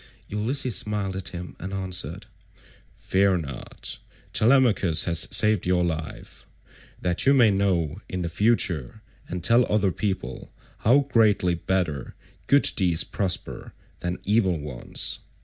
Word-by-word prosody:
Ulysses 120 Hz, +4 st, -1 dB
smiled 100 Hz, -2 st, -1 dB
at 95 Hz, -3 st, -5 dB
him 90 Hz, -1 st, -8 dB
and 95 Hz, +3 st, -6 dB
answered, 95 Hz, -1 st, -3 dB, 0.7 s
"Fear 95 Hz, 0 st, +1 dB
not; 70 Hz, -7 st, -6 dB, 0.3 s
Telemachus 110 Hz, -, +3 dB
has 85 Hz, -2 st, +4 dB
saved 105 Hz, -4 st, +4 dB
your 90 Hz, -1 st, +2 dB
life, 80 Hz, -2 st, -6 dB, 0.5 s
that 90 Hz, +7 st, -1 dB
you 140 Hz, -, +6 dB
may 120 Hz, -5 st, +5 dB
know 95 Hz, -3 st, -1 dB
in 90 Hz, -2 st, -3 dB
future, 85 Hz, -, -1 dB, 0.3 s
and 90 Hz, -1 st, -5 dB
tell 120 Hz, +6 st, +5 dB
other 105 Hz, -2 st, +2 dB
people, 95 Hz, -1 st, -4 dB, 0.3 s
how 130 Hz, +6 st, +4 dB
greatly 110 Hz, -9 st, +2 dB
better 85 Hz, -5 st, -3 dB, 0.3 s
good 140 Hz, 0 st, +5 dB
deeds 85 Hz, -4 st, +2 dB
prosper 95 Hz, -4 st, -4 dB, 0.3 s
than 90 Hz, +1 st, -3 dB
evil 100 Hz, -4 st, +1 dB
ones. 70 Hz, -4 st, -3 dB
95 Hz, 125 wpm, -24 LUFS, 85-105 Hz, 0.7 s, you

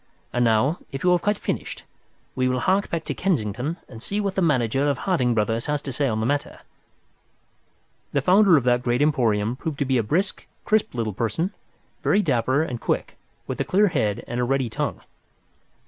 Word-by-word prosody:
And 125 Hz, -, +2 dB
now, 120 Hz, +8 st, +2 dB
if 135 Hz, -, -5 dB
you 180 Hz, -, +4 dB
have 175 Hz, -1 st, +3 dB
quite 205 Hz, +1 st, +1 dB
finished, -, -, -4 dB, 0.5 s
we 130 Hz, 0 st, 0 dB
will 125 Hz, -1 st, 0 dB
hark 195 Hz, +6 st, +1 dB
back 165 Hz, -1 st, -2 dB
to -, -, -3 dB
Kensington 140 Hz, -, -1 dB
and 115 Hz, -3 st, -11 dB
see 200 Hz, -, -2 dB
what 200 Hz, -2 st, -1 dB
the 190 Hz, -, 0 dB
manager 135 Hz, -3 st, +2 dB
of 140 Hz, -, 0 dB
Harding 130 Hz, -11 st, +1 dB
Brothers 115 Hz, +2 st, 0 dB
has 150 Hz, 0 st, 0 dB
to 140 Hz, -, -4 dB
say 140 Hz, +2 st, 0 dB
on 110 Hz, -3 st, -1 dB
the 110 Hz, -, -1 dB
matter." 145 Hz, +3 st, -2 dB, 1.5 s
The 140 Hz, -, 0 dB
founder 185 Hz, 0 st, +6 dB
of 135 Hz, -, +1 dB
that 120 Hz, 0 st, +2 dB
great 125 Hz, +2 st, +1 dB
emporium 115 Hz, -6 st, +1 dB
proved 145 Hz, +2 st, -5 dB
to 140 Hz, -, 0 dB
be 130 Hz, -2 st, +2 dB
a -, -, +3 dB
brisk, 180 Hz, -, -1 dB, 0.2 s
crisp 215 Hz, -10 st, +1 dB
little 115 Hz, -3 st, -2 dB
person, 120 Hz, -, -1 dB, 0.5 s
very 205 Hz, +1 st, +3 dB
dapper 130 Hz, 0 st, +2 dB
and 125 Hz, -7 st, -5 dB
quick, -, -, -2 dB, 0.3 s
with -, -, -3 dB
a -, -, +2 dB
clear 205 Hz, +2 st, +3 dB
head 110 Hz, -, -1 dB
and 120 Hz, +1 st, -3 dB
a -, -, +2 dB
ready 130 Hz, -2 st, 0 dB
tongue. -, -, -3 dB
135 Hz, 200 wpm, -24 LUFS, 120-170 Hz, 1.5 s, founder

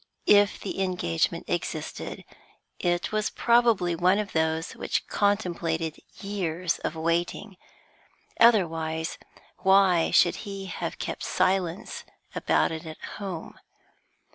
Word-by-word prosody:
If 205 Hz, 0 st, +5 dB
the 195 Hz, -, -4 dB
engagement 180 Hz, -, -1 dB
existed, -, -, -4 dB, 0.5 s
it 175 Hz, 0 st, 0 dB
was 215 Hz, 0 st, 0 dB
probably 230 Hz, -7 st, +3 dB
one 180 Hz, +3 st, +3 dB
of 210 Hz, -1 st, -3 dB
those 160 Hz, 0 st, 0 dB
which -, -, -2 dB
contemplated 170 Hz, -6 st, 0 dB, 0.2 s
years 180 Hz, -4 st, -2 dB
of 155 Hz, -, -3 dB
waiting, 170 Hz, +5 st, -1 dB, 0.8 s
otherwise 165 Hz, -8 st, +2 dB, 0.4 s
why 190 Hz, -3 st, +4 dB
should 175 Hz, -, +5 dB
she 195 Hz, -1 st, -6 dB
have 185 Hz, -, -5 dB
kept -, -, -5 dB
silence 185 Hz, -1 st, -1 dB, 0.3 s
about -, -, +1 dB
it 160 Hz, 0 st, -6 dB
at 155 Hz, -, -8 dB, 0.2 s
home? 190 Hz, -5 st, -6 dB
180 Hz, 110 wpm, -27 LUFS, 165-200 Hz, 0.8 s, If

